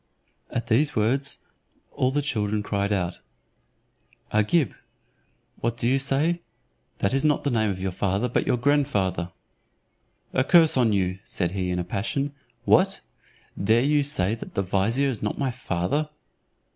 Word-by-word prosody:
At 120 Hz, -, -3 dB
these 130 Hz, +6 st, +2 dB
words 130 Hz, +6 st, +1 dB, 0.5 s
all 130 Hz, -, +1 dB
the 145 Hz, +2 st, 0 dB
children 105 Hz, -6 st, -1 dB
cried 100 Hz, 0 st, -1 dB
out, 90 Hz, -4 st, -1 dB, 1.1 s
"Agib, 110 Hz, +8 st, +2 dB, 0.8 s
what 115 Hz, 0 st, -2 dB
do 120 Hz, -, 0 dB
you 135 Hz, +2 st, +3 dB
say? 145 Hz, +6 st, +2 dB, 0.6 s
That 100 Hz, -, 0 dB
is 135 Hz, -, +2 dB
not 150 Hz, -2 st, +2 dB
the 140 Hz, -, 0 dB
name 110 Hz, -3 st, +1 dB
of 95 Hz, -2 st, -3 dB
your 95 Hz, 0 st, -2 dB
father, 100 Hz, +5 st, 0 dB
but 125 Hz, -, -1 dB
your -, -, +2 dB
grandfather." 105 Hz, -, +1 dB, 1.0 s
"A 130 Hz, -, +3 dB
curse 165 Hz, +1 st, +5 dB
on 120 Hz, -4 st, +3 dB
you," 95 Hz, -2 st, 0 dB
said 90 Hz, -2 st, -2 dB
he 95 Hz, -1 st, -2 dB
in 90 Hz, -, -1 dB
a 90 Hz, -, -1 dB
passion. 125 Hz, +10 st, -2 dB, 0.3 s
"What! 195 Hz, +2 st, +4 dB, 0.6 s
dare 115 Hz, +4 st, +4 dB
you 145 Hz, +1 st, +3 dB
say 140 Hz, -8 st, +1 dB
that 115 Hz, -, -8 dB
the 100 Hz, -, +1 dB
vizier 105 Hz, +9 st, +1 dB
is 120 Hz, -6 st, -4 dB
not 105 Hz, -, -2 dB
my 135 Hz, -2 st, 0 dB
father?" 125 Hz, -, -2 dB
115 Hz, 160 wpm, -25 LUFS, 100-140 Hz, 1.1 s, curse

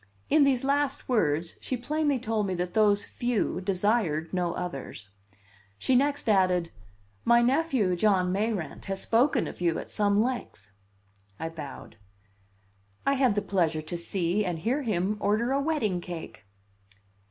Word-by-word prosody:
In 300 Hz, -1 st, +6 dB
these 265 Hz, -3 st, +2 dB
last 280 Hz, 0 st, 0 dB
words 165 Hz, -, 0 dB
she 255 Hz, -, -2 dB
plainly 295 Hz, +3 st, 0 dB
told 220 Hz, -4 st, -1 dB
me 185 Hz, -, -1 dB
that 180 Hz, 0 st, -3 dB
those 210 Hz, -2 st, +3 dB
"few" 240 Hz, -6 st, -1 dB
desired 185 Hz, -5 st, 0 dB
no 180 Hz, -2 st, 0 dB
others. 135 Hz, -, -6 dB, 0.7 s
She 260 Hz, -, 0 dB
next 285 Hz, +1 st, +1 dB
added: 185 Hz, -5 st, +2 dB, 0.5 s
"My 235 Hz, 0 st, +5 dB
nephew, 260 Hz, -, +2 dB
John 185 Hz, -1 st, +2 dB
Mayrant, 205 Hz, -2 st, -2 dB
has 195 Hz, 0 st, -3 dB
spoken 245 Hz, +6 st, +2 dB
of -, -, -9 dB
you 170 Hz, -2 st, +1 dB
at -, -, -7 dB
some 205 Hz, -1 st, +2 dB
length." 220 Hz, -, -3 dB, 0.7 s
I 160 Hz, -, -3 dB
bowed. 150 Hz, -8 st, -9 dB, 1.1 s
"I 275 Hz, -, +3 dB
had 260 Hz, -6 st, +2 dB
the 205 Hz, -, 0 dB
pleasure 165 Hz, -6 st, 0 dB
to 155 Hz, +3 st, -5 dB
see 175 Hz, +3 st, 0 dB
and 175 Hz, -4 st, -2 dB
hear 240 Hz, -, 0 dB
him 210 Hz, -4 st, -1 dB
order 220 Hz, +5 st, +1 dB
a 275 Hz, +1 st, +2 dB
wedding 275 Hz, -, 0 dB
cake." 160 Hz, -, -8 dB
205 Hz, 150 wpm, -28 LUFS, 175-245 Hz, 1.1 s, In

